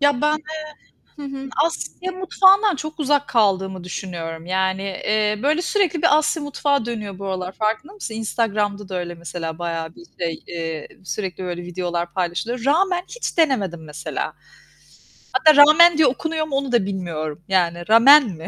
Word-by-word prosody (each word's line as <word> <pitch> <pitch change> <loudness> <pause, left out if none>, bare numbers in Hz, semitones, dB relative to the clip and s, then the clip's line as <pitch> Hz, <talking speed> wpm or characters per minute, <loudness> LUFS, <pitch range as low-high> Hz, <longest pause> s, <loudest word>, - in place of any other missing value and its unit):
Ya, 285 -3 +3
ben, 300 +1 +3 0.6
eee, 295 - -13
hı 275 -1 -6
hı, 270 0 -7 0.2
Asya 360 +2 -4
mutfağından 380 +1 +4
çok 310 +3 -6
uzak 290 0 +1
kaldığımı 190 -5 +1
düşünüyorum. 170 -3 -6
Yani, 190 +1 0
eee, 210 +2 0
böyle 305 +5 +2
sürekli 355 -4 0
bir 300 - +5
Asya 310 +1 0
mutfağı 285 -3 0
dönüyor 210 -5 -5
bu 195 - -6
aralar, 185 -1 -3
farkında 220 - -2
mısın? 400 - -7
Instagram'da 210 -3 -2
da 190 - -4
öyle 175 -1 -5
mesela 165 -1 -6
bayağı 165 -1 -4
bir 345 - -15
şey, 165 -2 -3
eee, 165 -2 -5 0.2
sürekli 185 +2 -4
böyle 175 -1 -4
videolar 175 -1 -3
paylaşılıyor. 195 +7 -2
Ramen 355 +5 +2
hiç - - -4
denemedim 200 - +1
mesela. 150 +1 -5 1.0
Hatta 315 -6 +5
ramen 305 +3 +8
diye 315 - +5
okunuyor 315 +4 -2
mu, 280 - -3
onu 275 -1 -1
da 235 -5 +2
bilmiyorum. 165 -6 -4
Yani 175 -2 0
ramen 270 +7 +8
mi? 165 -3 -8
210 Hz, 160 wpm, -21 LUFS, 175-295 Hz, 1.0 s, ramen